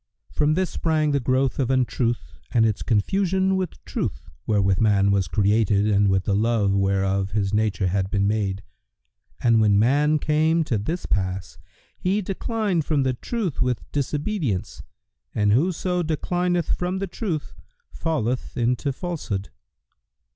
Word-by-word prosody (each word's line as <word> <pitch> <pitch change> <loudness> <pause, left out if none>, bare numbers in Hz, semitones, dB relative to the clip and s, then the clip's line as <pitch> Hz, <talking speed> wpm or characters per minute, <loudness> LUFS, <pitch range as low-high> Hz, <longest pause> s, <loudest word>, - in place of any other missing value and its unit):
From 150 0 +1
this 185 0 0
sprang 155 -2 +1
the 140 - +2
growth 130 +1 0
of 130 -3 +1
Untruth 120 - 0 0.2
and 115 -2 +4
its 110 -2 0
confusion 190 - +1
with 185 -2 -3
Truth, - - -4 0.2
wherewith 95 -3 +2
man 100 -2 +3
was 100 -3 +1
created 105 +2 +2
and 100 -1 +3
with 95 -1 +2
the 100 - 0
love 105 -1 +2
whereof 95 0 0
his 100 -2 0
nature 105 -2 +1
had 95 +1 0
been 100 -1 +1
made; 100 -2 -1 0.8
and 115 -2 +4
when 105 -2 +4
man 145 +7 +3
came 155 +2 +2
to 115 -8 -1
this 165 - -3
pass, 95 -3 -2 0.4
he 190 +3 0
declined 200 -2 -1
from 145 -2 +1
the 130 -1 +1
Truth 195 - -3
with 125 -2 0
disobedience 145 - -2 0.5
and 105 -1 +2
whoso 180 - +1
declineth 175 +2 0
from 180 +1 -2
the 195 - -2
Truth 175 -5 -4 0.4
falleth 130 -7 -2
into 125 +3 0
Falsehood." 130 - -4
125 Hz, 145 wpm, -24 LUFS, 100-165 Hz, 0.8 s, and